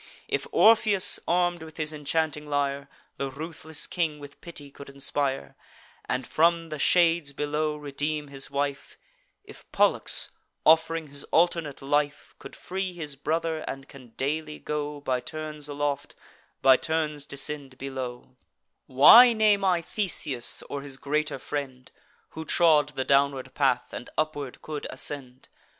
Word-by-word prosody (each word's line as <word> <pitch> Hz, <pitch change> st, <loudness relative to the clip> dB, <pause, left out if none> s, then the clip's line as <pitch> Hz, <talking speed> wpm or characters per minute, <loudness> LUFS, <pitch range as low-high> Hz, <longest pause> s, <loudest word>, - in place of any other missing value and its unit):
If -, -, -1 dB
Orpheus, 215 Hz, -3 st, +5 dB
arm'd 175 Hz, 0 st, +1 dB
with 160 Hz, -1 st, -11 dB
his 155 Hz, -1 st, -1 dB
enchanting 150 Hz, 0 st, -1 dB
lyre, 140 Hz, -1 st, -1 dB, 0.3 s
The 140 Hz, -, -2 dB
ruthless 160 Hz, +2 st, -4 dB
king 165 Hz, -4 st, -1 dB
with 145 Hz, -1 st, -13 dB
pity 145 Hz, -5 st, -9 dB
could 140 Hz, 0 st, -11 dB
inspire, 140 Hz, 0 st, -2 dB, 0.5 s
And 125 Hz, +1 st, -2 dB
from 165 Hz, +1 st, +2 dB
the 155 Hz, -1 st, -5 dB
shades 165 Hz, -3 st, +3 dB
below 150 Hz, +1 st, -1 dB
redeem 145 Hz, +1 st, -3 dB
his 135 Hz, -1 st, -7 dB
wife; 140 Hz, 0 st, -3 dB, 0.5 s
If -, -, -15 dB
Pollux, -, -, +2 dB, 0.3 s
off'ring 160 Hz, 0 st, +4 dB
his 140 Hz, 0 st, -6 dB
alternate 165 Hz, -5 st, +1 dB
life, 145 Hz, +1 st, -1 dB
Could -, -, -11 dB
free 190 Hz, 0 st, -4 dB
his 155 Hz, -5 st, -6 dB
brother, 160 Hz, +3 st, -1 dB
and 135 Hz, 0 st, -6 dB
can 125 Hz, -4 st, -15 dB
daily 150 Hz, +2 st, -2 dB
go 150 Hz, -1 st, -4 dB
By 130 Hz, -3 st, 0 dB
turns 150 Hz, +3 st, -6 dB
aloft, 145 Hz, -1 st, -3 dB, 0.5 s
by 130 Hz, -1 st, +7 dB
turns 150 Hz, -2 st, -2 dB
descend 140 Hz, -1 st, -6 dB
below: 130 Hz, -1 st, -6 dB, 0.5 s
Why 230 Hz, -, +9 dB
name 210 Hz, -2 st, +3 dB
I 180 Hz, -3 st, +2 dB
Theseus, 155 Hz, -, -1 dB
or 140 Hz, -, -6 dB
his 140 Hz, -1 st, -6 dB
greater 150 Hz, +1 st, -1 dB
friend, 130 Hz, -1 st, -6 dB, 0.4 s
Who 160 Hz, -, -7 dB
trod 155 Hz, -3 st, +4 dB
the 130 Hz, -, -2 dB
downward 140 Hz, -1 st, +2 dB
path, -, -, +1 dB
and -, -, -7 dB
upward 145 Hz, -4 st, -3 dB
could 150 Hz, -2 st, -5 dB
ascend? 130 Hz, -3 st, -4 dB
150 Hz, 140 wpm, -27 LUFS, 140-160 Hz, 0.5 s, Why